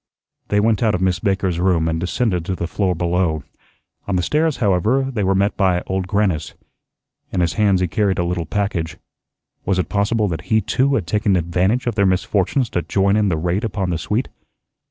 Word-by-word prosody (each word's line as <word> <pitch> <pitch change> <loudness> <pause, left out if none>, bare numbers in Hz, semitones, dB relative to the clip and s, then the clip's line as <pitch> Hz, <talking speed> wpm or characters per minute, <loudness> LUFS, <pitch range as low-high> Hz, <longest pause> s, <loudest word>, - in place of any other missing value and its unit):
They 105 - +2
went 110 -1 +2
out 110 -4 +2
of 90 - -3
Miss 90 -2 +1
Baker's 95 -2 0
room 90 -3 +2
and 80 0 -1
descended 90 0 -1
to 95 - -2
the 85 - -3
floor 90 +1 -1
below. 85 -3 0 0.6
On 100 - 0
the 90 - +1
stairs, 155 - +1
however, 110 +5 +2
they 110 -5 -1
were 95 0 +2
met 100 +2 +1
by 90 -3 +1
Old 95 -1 -2
Grannis. 95 -6 0 0.8
In 95 - -1
his 85 -2 +1
hands 100 -4 +2
he 90 - +1
carried 95 +3 0
a 85 - 0
little 85 -1 -2
package. 100 -6 -2 0.7
Was 95 -1 0
it 90 -3 -1
possible 105 +2 +1
that 80 -3 -5
he 110 - +4
too 135 +5 +1
had 105 - -1
taken 105 +2 +1
advantage 90 +7 0
of 120 - 0
their 100 -2 +2
misfortunes 100 +6 +1
to 90 - 0
join 95 +4 +1
in 105 -2 +2
the 80 - 0
raid 90 +5 -1
upon 95 -4 -2
the 85 - -1
suite? 105 +9 -1
95 Hz, 205 wpm, -20 LUFS, 90-105 Hz, 0.8 s, he